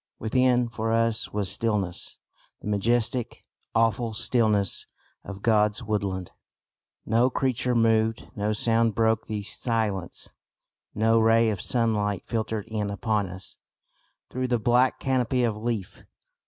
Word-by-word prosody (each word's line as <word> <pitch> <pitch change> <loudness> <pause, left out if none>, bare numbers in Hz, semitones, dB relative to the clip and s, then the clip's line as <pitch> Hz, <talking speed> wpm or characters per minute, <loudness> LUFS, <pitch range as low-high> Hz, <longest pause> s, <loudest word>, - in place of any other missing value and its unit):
Within 125 +2 +2
for 115 -1 -3
us 115 0 +1
was 100 -3 -1
stillness 105 -6 -2 0.4
the - - -9
majestic, 115 +3 0 0.3
awful 115 0 +1
stillness 105 -5 +1 0.4
of 100 0 -9
God's 105 -2 +2
woodland. 100 -4 -2 0.7
No 115 +3 +3
creature 130 -2 0
moved, 115 -1 +2
no 105 0 -1
sound 115 0 +1
broke 110 -1 +1
the 105 -2 -3
silence, 105 -4 -2 0.6
no 115 +2 +3
ray 115 0 +4
of 100 -4 -4
sunlight 105 -5 0
filtered 110 -2 -2
in 105 -2 -3
upon 105 0 -1
us 90 +1 -10 0.7
through 130 0 -3
the 125 -1 +1
black 120 +3 +2
canopy 130 -1 +1
of 115 -3 +1
leaf. 110 -3 -4
110 Hz, 125 wpm, -26 LUFS, 105-115 Hz, 0.7 s, ray